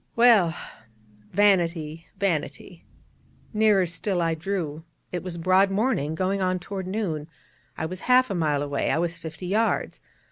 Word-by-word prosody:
_' - - -41
Well, 220 -8 +5 0.8
vanity, 170 -5 +1
vanity. 175 -2 -3 0.7
Nearer 210 -3 +4
still 180 +2 -2
I 165 -1 +1
drew: 160 -2 -3 0.3
it 180 - -3
was 180 -2 -6
broad 185 +3 +4
morning, 195 - 0
going 190 +3 0
on 185 0 +1
toward 190 +1 -6
noon: 180 -7 -3 0.5
I - - -2
was 180 +3 -5
half 255 -1 +5
a - - 0
mile 150 -5 0
away, 140 -1 -1
I - - +2
was 170 0 -2
fifty 160 +1 -8
yards. 215 +5 0
180 Hz, 150 wpm, -25 LUFS, 160-200 Hz, 0.8 s, Well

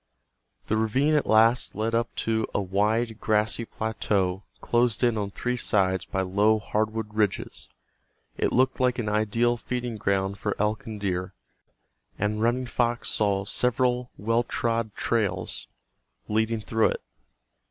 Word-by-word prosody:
The 110 - 0
ravine 130 +8 +2
at 150 - +2
last 115 +3 +4
led 110 +2 -1
up 115 0 0
to 110 -1 +1
a - - +3
wide 105 +4 0
grassy 110 +2 +1
plateau 100 -5 -1 0.2
closed 120 0 +1
in 120 -2 +3
on 105 -2 -2
three 125 +5 -2
sides 95 -5 +1
by 95 - -2
low 100 +4 +3
hardwood 110 0 -2
ridges. 105 -2 -1 0.7
It - - 0
looked 130 +1 +2
like 125 -1 +2
an 115 -4 -2
ideal 110 +3 +1
feeding 120 -1 -4
ground 100 0 0
for 105 0 -1
elk 110 +4 -1
and 110 -2 -6
deer, 90 -1 -2 0.8
and 105 +2 -1
Running 120 +3 +1
Fox 120 0 0
saw 100 -2 +1
several 125 +2 +1
well 115 +3 +1
trod 115 -3 -2
trails 100 -6 -1 0.6
leading 110 +1 0
through 110 +1 +2
it. - - -3
110 Hz, 140 wpm, -26 LUFS, 105-120 Hz, 0.8 s, last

